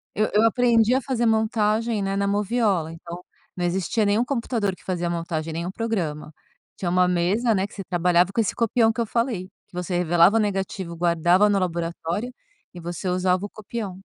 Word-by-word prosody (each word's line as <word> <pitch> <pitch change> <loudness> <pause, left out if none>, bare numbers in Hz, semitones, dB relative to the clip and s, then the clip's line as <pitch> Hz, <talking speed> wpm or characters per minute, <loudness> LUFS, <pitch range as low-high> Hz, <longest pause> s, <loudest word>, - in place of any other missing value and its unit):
Eu 215 +2 +1
eu 210 - +5
aprendi 235 0 +3
a 260 - +2
fazer 245 -3 -1
montagem, 220 0 +1
né, 195 0 -1
na 200 - 0
moviola, 205 -5 0
então 170 +2 -9 0.3
não 180 - -2
existia 190 +5 0
nenhum 210 +4 +2
computador 230 -6 -1
que - - -21
fazia 175 -2 -2
montagem, 165 -2 -3
nenhum 170 +3 -3
programa. 180 -9 -3 0.4
Tinha 175 - -2
uma 180 0 +3
mesa, 190 +7 +1
né, 190 0 0
que - - -17
você 195 - -6
trabalhava 175 +1 +2
com 230 - +1
esse 220 - 0
copião 225 0 +2
que 235 - -4
eu 230 - 0
falei, 230 -5 -1 0.2
que - - -37
você 180 0 -3
revelava 175 +4 +4
o - - +4
negativo, 195 -4 -3
guardava 175 +4 +3
no 200 - +2
laboratório 175 +5 -3 0.4
e 175 - -8
você 175 +2 -5
usava 180 +1 +1
o - - -13
copião. 210 -3 -6
195 Hz, 190 wpm, -24 LUFS, 175-225 Hz, 0.4 s, eu